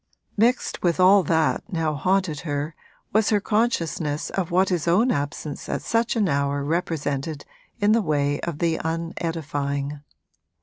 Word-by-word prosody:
Mixed 235 +4 +1
with 175 0 +1
all 190 +2 +7
that 160 -1 +1
now 165 -3 0
haunted 185 0 0
her 145 +1 -3 0.4
was 215 0 +3
her 210 - +3
consciousness 170 -9 -1
of 190 -4 -2
what 185 +2 +3
his 175 -3 -1
own 215 +9 +4
absence 145 0 -4
at - - -2
such 230 +2 +1
an 215 -4 +2
hour 140 -2 0
represented 150 -2 -2 0.3
in 205 0 +3
the 230 +1 +4
way 145 -4 0
of 170 -3 -4
the 165 0 0
unedifying. 155 -4 -3
165 Hz, 145 wpm, -24 LUFS, 145-190 Hz, 0.4 s, all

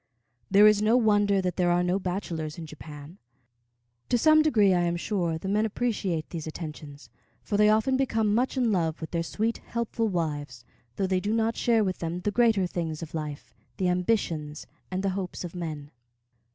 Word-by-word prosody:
There 205 +2 +6
is 210 -1 +5
no 220 +3 +4
wonder 205 -4 +3
that 180 -1 -2
there 180 -2 +2
are 175 0 +2
no 180 +2 +1
bachelors 175 -5 -4
in 165 - -6
Japan. 155 +2 -11 0.9
To 245 - +3
some 310 +5 +5
degree, 215 -11 +4
I 175 - +2
am 175 0 0
sure, 170 -3 -1
the 175 - -7
men 210 +2 +2
appreciate 205 -7 -2
these 160 -3 -5
attentions; 150 -5 -8 0.3
for 205 - -3
they 210 +1 +5
often 220 +5 +3
become 225 -6 +1
much 250 +4 0
in 245 -3 +2
love 165 -5 0
with 160 - -7
their 170 - 0
sweet, 220 +7 -2
helpful 235 -1 -2
wives, 145 - -3 0.3
though 195 - 0
they 185 -1 +1
do 210 +4 -1
not 225 0 +1
share 230 -2 +2
with 185 -2 -2
them 170 +2 -3
the 205 - -1
greater 225 -4 +3
things 165 -3 -4
of 160 - -9
life, 150 -2 -6 0.2
the 185 -2 +1
ambitions 175 -5 -1 0.2
and 185 +1 -3
the 195 - +1
hopes 185 -1 -4
of 175 - -6
men. 155 -5 -6
185 Hz, 190 wpm, -27 LUFS, 165-215 Hz, 0.9 s, There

